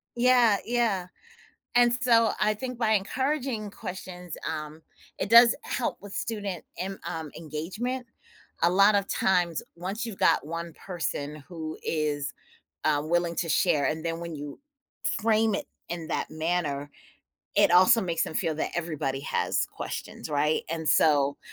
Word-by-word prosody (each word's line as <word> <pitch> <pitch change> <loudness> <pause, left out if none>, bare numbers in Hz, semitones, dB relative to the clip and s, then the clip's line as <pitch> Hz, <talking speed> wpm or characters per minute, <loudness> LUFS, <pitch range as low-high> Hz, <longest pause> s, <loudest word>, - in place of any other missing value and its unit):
Yeah, 240 -4 +5
yeah, 225 -7 +1 0.7
and, 240 -1 +5
so, 230 -2 +5
I 215 0 +3
think 250 +2 -5
by 220 -2 +2
encouraging 245 +1 0
questions, 180 -4 -7 0.2
um, 155 0 -6 0.4
it - - -2
does 235 0 +8
help 250 - -2
with 205 -1 -9
student 200 -6 -3
em 190 +2 -4
um, 160 -3 -5
engagement. 190 - -4 0.6
A 170 - +6
lot 200 +3 +5
of 200 -1 +1
times, 175 -4 +1
once 195 +7 -4
you've 220 -5 -6
got - - +3
1 165 +1 -5
person 150 -5 -4
who 160 -3 -6
is, 150 -2 -1 0.5
uh, 145 -2 +2
willing 170 +1 0
to 170 - -1
share, 150 -2 +3
and 160 +1 -1
then 165 0 -2
when 170 -2 -6
you 145 - -7 0.4
frame 220 -1 +2
it - - -4 0.2
in 170 -2 -4
that - - -2
manner, 155 -3 -1 0.7
it - - +5
also 220 +6 +7
makes 170 -3 0
them - - -5
feel 160 -1 0
that - - -2
everybody 150 -5 -2
has - - 0
questions, - - -6
right, 150 +1 +1
and, 160 -2 -1
so, 145 -2 +4
175 Hz, 150 wpm, -27 LUFS, 155-215 Hz, 0.7 s, does